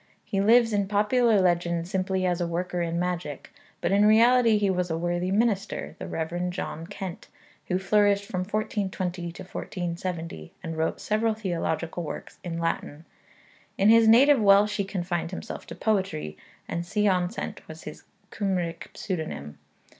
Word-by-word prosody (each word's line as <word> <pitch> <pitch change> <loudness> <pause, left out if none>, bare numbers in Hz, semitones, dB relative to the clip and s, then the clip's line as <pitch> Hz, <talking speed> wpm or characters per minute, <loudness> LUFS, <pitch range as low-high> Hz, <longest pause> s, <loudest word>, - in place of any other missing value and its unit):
He 195 -2 -1
lives 230 +2 +5
in 200 -1 +1
popular 210 +2 +3
legend 170 -2 +1
simply 190 0 -1
as 180 -1 0
a 175 - 0
worker 175 +1 -2
in 170 0 -1
magic, 175 -5 -3 0.3
but - - 0
in 200 +1 +4
reality 230 +1 +5
he 205 -1 +1
was 180 -1 -1
a 160 - -1
worthy 175 +2 -1
minister, 205 0 0
the - - -5
Rev. 175 +2 -2
John 165 -2 -5
Kent, 185 -2 -7 0.4
who 180 - +1
flourished 200 +1 +3
from 185 - -4
1420 185 -3 -2
to - - -9
1470, 170 - -5
and 165 -2 -4
wrote 160 0 -1
several 215 +1 0
theological 175 -4 -2
works 160 - -7
in 170 -2 -4
Latin. 165 -2 -3 0.7
In 200 +2 +4
his 225 0 +7
native 260 +3 +7
Welsh 205 +1 +5
he 200 - 0
confined 175 -3 -2
himself 190 +4 -7
to - - -8
poetry, 190 - -1 0.3
and 170 0 -3
Sion 185 -1 +1
Cent 230 - -6
was - - -10
his - - -9 0.3
Cymric 185 -5 -2
pseudonym. 160 - -5
185 Hz, 155 wpm, -26 LUFS, 170-210 Hz, 0.7 s, his